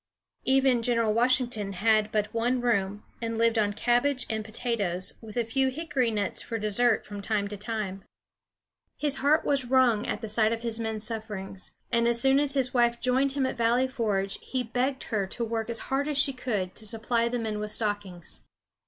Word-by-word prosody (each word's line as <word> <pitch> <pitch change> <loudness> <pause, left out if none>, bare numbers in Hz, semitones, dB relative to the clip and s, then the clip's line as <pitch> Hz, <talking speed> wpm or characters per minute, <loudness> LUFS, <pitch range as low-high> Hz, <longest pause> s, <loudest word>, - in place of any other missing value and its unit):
Even 265 -2 +4
General 230 -2 +2
Washington 240 -4 +1
had 215 +2 +2
but 210 -1 -1
one 240 +2 +1
room, 205 -4 0 0.2
and 230 -1 -2
lived 230 0 +3
on 205 -1 +2
cabbage 245 +5 +1
and 220 -1 -2
potatoes, 215 -5 -2
with 220 0 -9
a 235 - +1
few 265 +4 +1
hickory 275 -3 0
nuts 210 -2 -1
for 230 - -4
dessert 220 +2 +2
from 205 -1 -7
time 205 0 0
to 205 - -5
time. 205 -2 -4 0.9
His 295 -2 0
heart 295 +3 +3
was 275 -3 +1
wrung 245 -4 +3
at - - -2
the 220 - -4
sight 215 +1 +2
of 230 0 -2
his 230 -1 0
men's 220 -2 -3
sufferings, 210 -4 -4 0.2
and 235 0 +3
as 235 0 +2
soon 270 +2 +4
as 285 -1 0
his 260 -2 +1
wife 240 -1 +3
joined 260 +2 +2
him 275 -2 +1
at 260 - -3
Valley 235 +3 +3
Forge, 205 -6 -1
he 255 -1 -2
begged 250 +3 -1
her 200 -3 +1
to 235 +4 -3
work 225 0 -3
as 235 - 0 0.2
hard 280 +2 +1
as 295 -2 -1
she 280 -1 +3
could 210 -8 -2
to 220 - -6
supply 230 +2 0
the 245 - -1
men 220 -2 -2
with 210 0 -2
stockings. 205 -5 -2
230 Hz, 195 wpm, -28 LUFS, 210-250 Hz, 0.9 s, Even